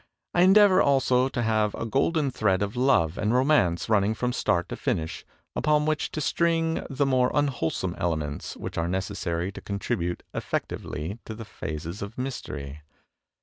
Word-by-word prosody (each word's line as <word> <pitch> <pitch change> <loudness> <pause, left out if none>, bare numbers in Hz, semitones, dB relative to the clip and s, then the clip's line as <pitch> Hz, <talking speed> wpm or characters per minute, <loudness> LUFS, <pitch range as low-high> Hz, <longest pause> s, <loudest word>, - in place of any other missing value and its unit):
I 175 - +3
endeavor 195 +1 +7
also 130 -2 +3
to 130 -3 -2
have 110 -2 +1
a - - -4
golden 140 +4 +1
thread 100 -5 +1
of 100 +3 -4
love 120 - +2
and 105 +3 +1
romance 125 - +3
running 105 -1 +2
from 125 +2 -1
start 90 -8 +1
to - - -4
finish, 80 0 -2 0.3
upon 150 -1 +2
which 155 0 0
to - - -2
string 165 +3 +1
the 140 +1 0
more 130 -2 +3
unwholesome 125 - 0
elements 80 -4 -2
which - - -5
are 85 - 0
necessary 95 -1 -2
to - - -9
con 100 - -4
tribute 90 -5 -2
effectively 85 +9 -4
to 110 - -6
the 115 0 -8
phases 80 -1 -6
of 100 +3 -6
mystery. 75 - -5
110 Hz, 165 wpm, -26 LUFS, 90-135 Hz, 0.3 s, endeavor